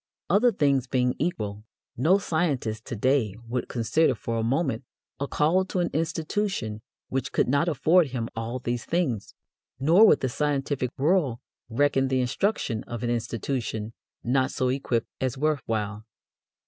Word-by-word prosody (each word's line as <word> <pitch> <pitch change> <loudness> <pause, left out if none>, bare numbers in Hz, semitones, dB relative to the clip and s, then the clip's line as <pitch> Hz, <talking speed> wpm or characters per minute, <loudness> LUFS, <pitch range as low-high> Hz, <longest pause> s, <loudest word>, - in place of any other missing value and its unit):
Other 225 +6 +5
things 140 - +2
being 125 -1 +1
equal, 105 -11 -2 0.3
no 160 +11 +4
scientist 145 - -1
to - - -5
day 120 -3 +1
would 125 +1 -2
consider 125 +4 +2
for 115 +1 -3
a - - 0
moment 130 0 0 0.4
a 140 - -2
call 165 +7 +2
to 185 - -2
an 175 - 0
institution 160 - -2 0.3
which 130 -1 -2
could - - +2
not 140 +6 +2
afford 165 +3 +4
him 120 -3 -3
all 115 +2 -3
of 130 - -5
these 120 -1 -2
things, 140 - -1 0.4
nor 170 +11 +6
would - - +5
the 130 - +1
scientific 140 -1 -1
world 145 -4 +2 0.3
reckon 135 +2 +2
the 130 0 +1
instruction 125 - 0
of 120 -1 -6
an 120 - 0
institution 115 -1 -3 0.3
not 130 +2 +2
so 130 - 0
equipped 125 -3 0 0.2
as 130 -1 -1
worth 150 -1 +1
while. 105 -1 -2
130 Hz, 160 wpm, -26 LUFS, 115-155 Hz, 0.4 s, nor